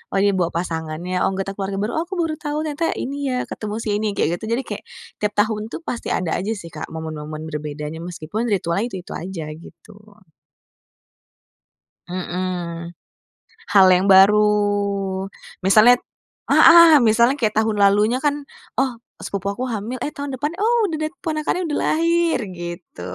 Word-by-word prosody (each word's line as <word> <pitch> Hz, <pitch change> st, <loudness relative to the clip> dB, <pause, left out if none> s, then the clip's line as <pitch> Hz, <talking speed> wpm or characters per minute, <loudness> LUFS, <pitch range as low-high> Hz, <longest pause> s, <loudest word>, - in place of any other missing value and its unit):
oh -, -, +3 dB
ini 200 Hz, -, +4 dB
bawa 180 Hz, -4 st, -1 dB
pasangannya, 170 Hz, +1 st, -3 dB
oh -, -, +2 dB
anggota 195 Hz, 0 st, -3 dB
keluarga 195 Hz, 0 st, -4 dB
baru, 215 Hz, -, -2 dB
oh -, -, 0 dB
aku 380 Hz, -, -5 dB
baru 325 Hz, -3 st, -1 dB
tahu, 300 Hz, 0 st, -3 dB
ternyata 315 Hz, +1 st, -1 dB
ini 275 Hz, +2 st, -4 dB
ya, 250 Hz, -1 st, -1 dB
ketemu 210 Hz, -1 st, -6 dB
si -, -, -3 dB
ini, 215 Hz, -, -1 dB
kayak 175 Hz, +1 st, 0 dB
gitu. -, -, -16 dB
Jadi 265 Hz, -, -3 dB
kayak -, -, -7 dB, 0.4 s
tiap 210 Hz, 0 st, -1 dB
tahun 210 Hz, 0 st, +1 dB
tuh -, -, -7 dB
pasti 240 Hz, -7 st, -5 dB
ada 180 Hz, -3 st, -2 dB
aja 200 Hz, +4 st, -2 dB
sih, 170 Hz, -5 st, -10 dB
Kak, 155 Hz, -, -6 dB
momen-momen 155 Hz, -1 st, -6 dB
berbedanya, 150 Hz, 0 st, -5 dB
meskipun 175 Hz, +6 st, -4 dB
ritualnya 195 Hz, 0 st, 0 dB
itu-itu 185 Hz, -6 st, -8 dB
aja, 175 Hz, -2 st, -5 dB
gitu. 165 Hz, +5 st, -14 dB, 2.2 s
Mhm. 175 Hz, -2 st, -4 dB, 0.8 s
Hal 195 Hz, -2 st, +7 dB
yang 185 Hz, +1 st, +3 dB
baru, 195 Hz, +2 st, +7 dB, 1.2 s
misalnya 215 Hz, +5 st, +7 dB, 0.6 s
heeh, 330 Hz, -2 st, +8 dB
misalnya 235 Hz, +4 st, +4 dB
kayak 215 Hz, -5 st, 0 dB
tahun 220 Hz, 0 st, +1 dB
lalunya 205 Hz, +4 st, +4 dB
kan, 290 Hz, -1 st, +3 dB, 0.5 s
oh 270 Hz, -1 st, +2 dB, 0.3 s
sepupu 200 Hz, -1 st, -4 dB
aku 245 Hz, +5 st, -4 dB
hamil, 225 Hz, +3 st, -4 dB
eh -, -, -2 dB
tahun 285 Hz, -1 st, -4 dB
depan, 290 Hz, +4 st, -2 dB
oh 455 Hz, +4 st, +2 dB
udah 325 Hz, -, -3 dB
dat 310 Hz, 0 st, -2 dB
ponakannya 315 Hz, +2 st, -1 dB
udah 295 Hz, -, -1 dB
lahir, 335 Hz, +1 st, +2 dB, 0.2 s
gitu. 175 Hz, -, -8 dB
205 Hz, 160 wpm, -21 LUFS, 175-260 Hz, 2.2 s, heeh